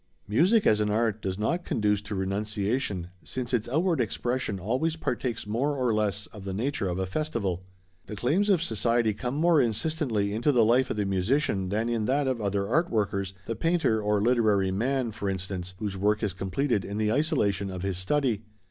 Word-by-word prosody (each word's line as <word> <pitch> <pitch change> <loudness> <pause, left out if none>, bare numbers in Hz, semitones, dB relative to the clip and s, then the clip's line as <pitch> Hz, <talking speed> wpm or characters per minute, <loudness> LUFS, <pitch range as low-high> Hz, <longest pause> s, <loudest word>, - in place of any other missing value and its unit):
Music 185 - +3
as 110 - +4
an 105 0 +1
art 110 0 +1
does 95 -1 -3
not 170 +12 0
conduce 105 - +1
to 105 0 -6
renunciation, 100 0 -2
since 130 -1 -5
its 120 -1 0
outward 165 +2 +2
expression 120 -2 -2
always 130 - 0
partakes 125 -7 -2
more 130 +8 0
or 125 -3 +1
less 105 -1 0
of 105 -3 -9
the 95 -1 -4
nature 115 -3 -1
of 90 - -2
a 95 - -1
festival. 100 - -2 0.5
The 105 - -6
claims 165 - +1
of 180 -5 +3
society 115 -3 +1
come 125 +5 -4
more 165 0 +4
insistently 115 -4 0
into 120 +7 +2
the 120 -5 +4
life 125 +4 +3
of - - -2
the 105 - 0
musician 95 +1 0
than 110 +4 0
in 115 -2 0
that 140 +4 +1
of 130 -3 -1
other 100 -1 0
art 160 - +2
workers, 100 -3 -1
the 115 - -3
painter 165 -5 +1
or 105 0 +1
literary 110 -5 +3
man, 120 +4 0
for 100 -1 -3
instance, 95 -1 -4
whose 105 -2 -3
work 105 +3 +1
is 100 -4 0
completed 100 +4 -1
in 100 +2 -5
the 110 0 +1
isolation 105 - +1
of 90 -1 -5
his 95 -2 -1
study. 120 +1 +1
110 Hz, 195 wpm, -27 LUFS, 100-130 Hz, 0.5 s, as